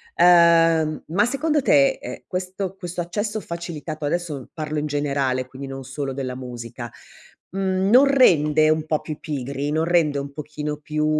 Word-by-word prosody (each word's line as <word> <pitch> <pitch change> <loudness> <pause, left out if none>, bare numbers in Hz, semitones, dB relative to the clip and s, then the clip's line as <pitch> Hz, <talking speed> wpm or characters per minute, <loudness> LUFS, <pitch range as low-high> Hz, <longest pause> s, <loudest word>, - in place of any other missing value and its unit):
Ehm, 165 -3 +5
ma 185 +7 +2
secondo 295 +4 0
te, 145 - +5
eh, 125 - -8
questo 185 +1 -4
questo 175 -2 -5
accesso 205 +5 -3
facilitato, 170 -4 -6
adesso 150 -4 -3
parlo 155 -1 -3
in 150 - -2
generale 140 -3 -1
quindi 135 +1 -9
non 135 0 -7
solo 135 +1 -4
della 130 -2 -4
musica, 120 -1 -7 0.6
mhmm, 190 0 0
non 260 +4 +7
rende 155 - +4
un 155 0 +2
po' 155 -1 0
più 155 -1 -7
pigri, 140 0 -4
non 160 +1 +1
rende 165 -4 +2
un 140 0 -7
pochino 150 0 -5
più 150 +1 -2
155 Hz, 160 wpm, -22 LUFS, 140-175 Hz, 0.6 s, non